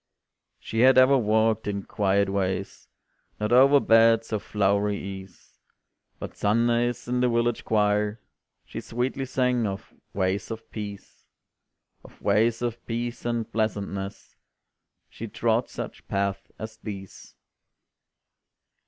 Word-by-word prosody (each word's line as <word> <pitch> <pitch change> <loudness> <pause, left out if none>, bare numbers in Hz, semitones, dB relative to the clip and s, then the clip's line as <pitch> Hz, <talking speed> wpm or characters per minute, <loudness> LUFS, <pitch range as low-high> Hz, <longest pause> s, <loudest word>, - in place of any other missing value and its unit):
She 110 - -4
had 130 +2 +6
ever 130 +2 +7
walked 110 -2 +2
in 100 -1 -2
quiet 100 0 +1
ways, 95 -1 -3 0.5
Not 105 +1 -1
over 135 +3 +7
beds 115 -1 +4
of 105 - 0
flowery 100 0 +1
ease, 95 -2 -10 0.6
But - - -8
Sundays 120 +3 +1
in 125 0 0
the 125 0 +3
village 120 0 0
choir 105 0 +1 0.5
She - - -7
sweetly 125 +3 -2
sang 125 -3 +1
of 100 0 -6 0.2
"ways 95 0 -1
of 115 0 -7
peace," 100 -2 -8 0.8
Of - - -16
"ways 110 +4 +2
of 120 -1 -3
peace 120 +1 -4
and 120 -2 -2
pleasantness," 100 -3 -3 0.7
She - - -8
trod - - 0
such - - -8
paths 100 0 -2
as 110 0 -8
these. 100 -3 -9
110 Hz, 120 wpm, -26 LUFS, 100-120 Hz, 0.8 s, ever